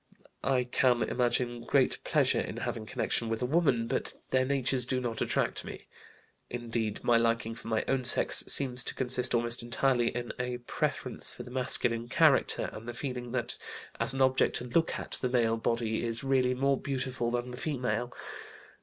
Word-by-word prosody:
I 130 -2 +2
can 125 -1 +2
imagine 120 0 0
great 135 +2 +1
pleasure - - +2
in - - -6
having 110 -1 -4
connection 115 +2 -1
with 115 +1 -2
a - - +2
woman, 135 -5 +2
but - - -2 0.2
their 130 0 +3
natures 130 -2 +1
do 130 0 0
not 120 -3 -4
attract - - 0
me. - - -9 0.6
Indeed, 115 -3 -3
my 120 - +4
liking 115 -1 0
for 115 - -10
my 110 -1 0
own 135 -1 0
sex 120 - +4
seems 125 -2 +2
to - - -4
consist 125 -1 +2
almost 120 0 +1
entirely 120 +1 +1
in 120 0 -3
a 125 0 -2
preference 120 - -1
for - - -8
the 125 - -11
masculine 120 -2 +2
character, - - +3
and 110 +2 -9
the 120 - -6
feeling 125 -2 -5
that 120 -1 -2 0.4
as 135 - +5
an 135 - -1
object 130 0 +2
to - - +1
look 165 +7 0
at - - -5
the 125 - 0
male 115 -2 +2
body 115 0 -1
is 115 +1 -2
really 130 -2 +2
more 135 +1 +1
beautiful 130 -3 -2
than 120 +1 -3
the 125 - -8
female. 125 -4 -2
125 Hz, 180 wpm, -30 LUFS, 115-130 Hz, 0.6 s, as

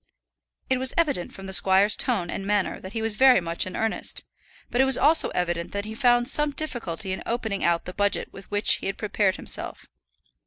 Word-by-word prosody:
It 260 -1 0
was 260 0 -1
evident 290 - 0
from 195 - -11
the 190 - -6
squire's 195 +2 +4
tone 200 -10 -1
and - - -5
manner 205 -1 -1
that 190 +2 -10
he 225 -1 -3
was 225 -1 -1
very 260 +2 +5
much 170 0 -1
in 185 - -7
earnest; 225 0 -3 0.5
but 245 - +2
it - - +4
was 265 -1 +4
also 315 +2 +5
evident 175 -1 -3
that 200 0 -3
he 215 - -7
found 240 0 +2
some 295 +2 +3
difficulty 215 - -4
in 190 - -4
opening 220 -4 -3
out 170 0 +1
the 180 - -7
budget 205 +1 -1
with 195 - -13
which 205 0 +3
he - - -6
had 195 - -4
prepared 205 -2 0
himself. - - -1
205 Hz, 210 wpm, -24 LUFS, 190-245 Hz, 0.5 s, very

